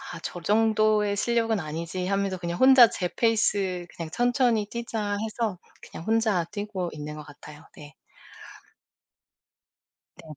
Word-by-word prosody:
아 - - -7
저 175 - -6
정도의 215 0 +2
실력은 225 0 +1
아니지.' 165 +3 -4
하면서 195 -1 -1
그냥 170 0 -4
혼자 260 -3 +8
제 180 -3 -3
페이스 200 -6 +1
'그냥 165 -2 -6
천천히 245 - +1
뛰자.' 220 -3 -3
해서 220 -3 -3 0.2
그냥 165 - -10
혼자 220 -5 +2
뛰고 205 -4 -4
있는 150 0 -7
것 150 - -9
같아요. 150 +1 -13
네. 145 -1 -13 2.2
네네. 155 -3 -12
205 Hz, 265 characters per minute, -26 LUFS, 170-225 Hz, 2.2 s, 혼자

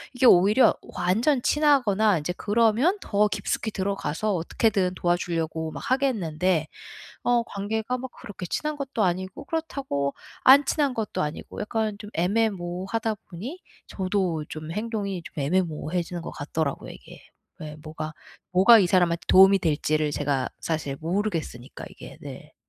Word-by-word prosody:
이게 250 - +2
오히려 210 +4 +6 0.2
완전 215 +11 +2
친하거나 225 - +3
인제 155 +4 -3
그러면 230 - +2
더 210 0 +2
깊숙히 210 +1 -2
들어가서 200 0 -2
어떻게든 185 +2 0
도와주려고 165 -2 -1
막 - - -7
하겠는데 185 - +1 0.6
어 240 -1 +2
관계가 220 +4 -3
막 260 +1 -6
그렇게 205 -6 -8
친한 300 - -2
것도 270 -6 -2
아니고 185 +7 -2
그렇다고 275 - -2 0.3
안 275 +2 +8
친한 285 -3 +1
것도 220 -4 -3
아니고 150 +1 -6
약간 215 -1 -2
좀 210 - -9
애매모호하다 195 +2 -1
보니 230 - -7 0.3
저도 185 -5 -1
좀 155 0 -7
행동이 205 -2 -3
좀 - - -11
애매모호해지는 175 +1 -1
것 - - -7
같더라고요 145 0 -3
이게. - - -13 0.4
예 150 -1 -7
뭐가 155 0 -6 0.4
뭐가 205 +6 +8
이 190 - +3
사람한테 175 -2 +2
도움이 195 +1 +7
될지를 155 -2 0
제가 140 -3 -1
사실 155 -4 -2
모르겠으니까 165 - -3
이게. - - -12
네. - - -10
190 Hz, 335 characters per minute, -25 LUFS, 165-225 Hz, 0.6 s, 안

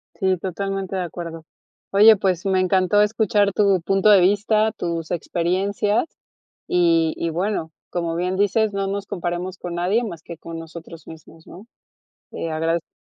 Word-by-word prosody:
Sí, 190 -2 +1
totalmente 195 +1 -4
de 185 - -1
acuerdo. 165 -2 -7 0.5
Oye, 215 +3 +7
pues, 185 -1 -1
me 190 -1 +2
encantó 185 +2 +3
escuchar 210 -1 +2
tu 195 -4 +3
punto 195 +4 +2
de 200 -2 +8
vista, 210 +3 +2
tus 165 -2 -4
experiencias, 190 - 0 0.6
y 165 -2 +2
y 170 - -2
bueno, 170 -1 -2 0.2
como 170 -2 -2
bien 180 +2 -1
dices, 205 +1 +1
no 195 0 -1
nos 200 0 -3
comparemos 180 -1 -4
con 175 -1 -6
nadie, 185 +7 +1
más 170 -8 -6
que 170 - -9
con 165 0 -8
nosotros 165 0 -11
mismos, 160 0 -14
¿no? 190 +5 -12 0.7
Te 165 - -5
agradezco. 165 +1 -1
185 Hz, 155 wpm, -22 LUFS, 170-200 Hz, 0.7 s, de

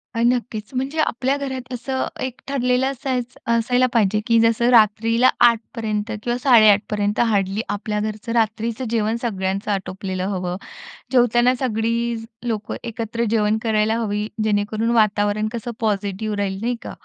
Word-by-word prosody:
अ, 230 - 0
नक्कीच 240 -2 -2
म्हणजे 270 +5 -2
आपल्या 270 -2 +1
घरात 260 -2 -5
असं 260 +2 -2 0.2
एक 255 -1 -4
ठरलेलं 250 -2 +1
असायचं 250 -2 -4
असायला 245 +2 +3
पाहिजे, 210 -2 +2
की 230 -1 +4
जसं 230 +1 +3
रात्रीला 230 +1 +4 0.2
8पर्यंत 225 -1 -3
किंवा 240 0 -1
8:30पर्यंत 210 -4 +4
हार्डली 205 -2 +1
आपल्या 210 0 -2
घरचं 215 +2 -4
रात्रीचं 225 +2 0
जेवण 220 -1 0
सगळ्यांचं 195 -3 -2
आटोपलेलं 190 -1 -3
हवं. 180 -2 -3 0.6
जेवताना 245 0 +4
सगळी 235 -1 0 0.3
लोकं 220 -3 -3
एकत्र 230 0 -3
जेवण 215 -1 +2
करायला 220 -1 +1
हवी. 210 -2 -1 0.2
जेणेकरून 215 +2 0
वातावरण 210 -1 +2
कसं 235 0 -4
पॉझिटिव्ह 205 0 -1
राहील 195 -1 -2
नाही 240 +2 -1
का. - - -7
225 Hz, 135 wpm, -21 LUFS, 210-240 Hz, 0.6 s, की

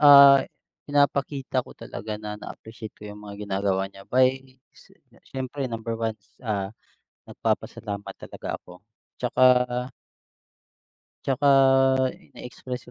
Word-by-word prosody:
ah, 140 -2 +10 0.5
pinapakita 140 -2 +1
ko - - -13
talaga 105 0 -6
na 105 0 -6
na-appreciate 110 -1 -9
ko - - -17
yung 105 0 -9
mga 105 0 -7
ginagawa 95 -1 0
niya 95 - -13
by, 130 0 +5 0.4
si - - -20 0.3
siyempre 130 0 -4
number 115 0 -4
1, 110 -1 -1 0.2
ah, 100 -4 -2 0.6
nagpapasalamat 105 -3 -3
talaga - - -6
ako. 90 0 -15 0.4
'Tsaka - - 0 1.8
'tsaka 135 +1 +1 0.9
na-express 125 0 -7
115 Hz, 105 wpm, -25 LUFS, 105-135 Hz, 1.8 s, ah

